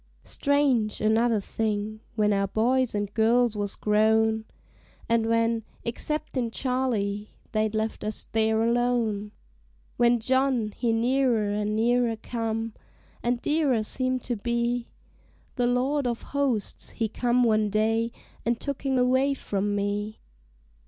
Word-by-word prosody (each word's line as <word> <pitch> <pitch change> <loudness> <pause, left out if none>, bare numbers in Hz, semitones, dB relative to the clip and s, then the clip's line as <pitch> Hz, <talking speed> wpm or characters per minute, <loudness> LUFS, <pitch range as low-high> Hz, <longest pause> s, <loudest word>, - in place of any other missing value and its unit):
Strange, 275 -7 +1
another 220 +1 +3
thing: 215 +1 -2 0.2
when 210 -1 +2
our 195 0 +1
boys 240 +4 +1
an' 205 0 0
girls 230 +1 +3
was 205 -1 -2
grown, 220 +1 +2 0.6
And 230 -1 +2
when, 230 0 +1 0.2
exceptin' 255 0 -2
Charley, 225 -6 -1 0.2
they'd 215 0 0
left 220 +1 -2
us 215 0 -3
there 220 0 +2
alone; 230 -3 +1 0.7
When 240 0 +4
John 260 -2 +1
he 235 -2 0
nearer 235 -2 +2
an' 210 +1 -1
nearer 235 +1 +2
come, 225 0 -3 0.5
an' 240 +1 +1
dearer 290 -7 +2
seemed 255 +2 -2
to 245 - -2
be, 235 +2 -1 0.7
The 245 -2 +1
Lord 260 +3 +1
of 235 -1 -3
Hosts 270 -8 -1
he 225 - -2
come 245 +3 +1
one 215 -2 +3
day 225 +2 +1 0.3
an' 235 +1 +1
took 280 +3 -5
him 265 -1 +1
away 260 +3 +3
from 205 -4 -2
me. 205 +1 -2
230 Hz, 130 wpm, -26 LUFS, 215-245 Hz, 0.7 s, When